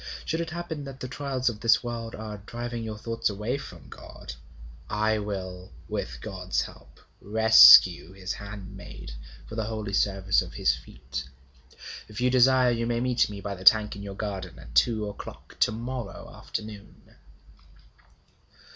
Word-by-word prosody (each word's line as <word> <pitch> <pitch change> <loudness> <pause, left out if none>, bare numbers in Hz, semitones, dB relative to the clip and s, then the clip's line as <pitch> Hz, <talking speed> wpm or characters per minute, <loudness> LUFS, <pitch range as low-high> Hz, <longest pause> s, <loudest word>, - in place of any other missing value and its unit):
Should 160 +1 -1
it 165 - -4
happen 170 -3 -5
that 135 -1 -9
the 130 - -5
trials 130 0 -3
of 115 -3 0
this 115 0 +4
world 115 -1 -5
are 105 -2 -7
driving 120 -1 -5
your 110 -1 -5
thoughts 115 +1 -2
away 105 +7 -3
from 85 - -11
God, - - -10 0.6
I 110 +1 +1
will 95 -3 -5 0.2
with - - -4
God's 90 +3 -2
help - - -11 0.2
rescue 110 -5 +8
his 95 -1 -5
handmaid 100 - -9 0.3
for - - -11
the 110 -1 -2
holy 110 -2 -4
service 100 -1 +2
of - - -8
his 60 - +3
feet. 65 +2 -8 0.8
If 105 +1 -9
you 125 +1 +2
desire, 130 0 +5
you 115 0 -1
may 120 0 0
meet 125 -2 +2
me 100 -1 -7
by 100 0 -4
the 95 -1 -9
tank 110 +2 +6
in 100 - -8
your 100 -1 -7
garden 95 -4 -5
at - - -13
two 105 - +3
o'clock 105 - -10
to - - +4
morrow 120 -1 -6
afternoon.' 105 -2 -8
110 Hz, 160 wpm, -27 LUFS, 100-120 Hz, 0.8 s, rescue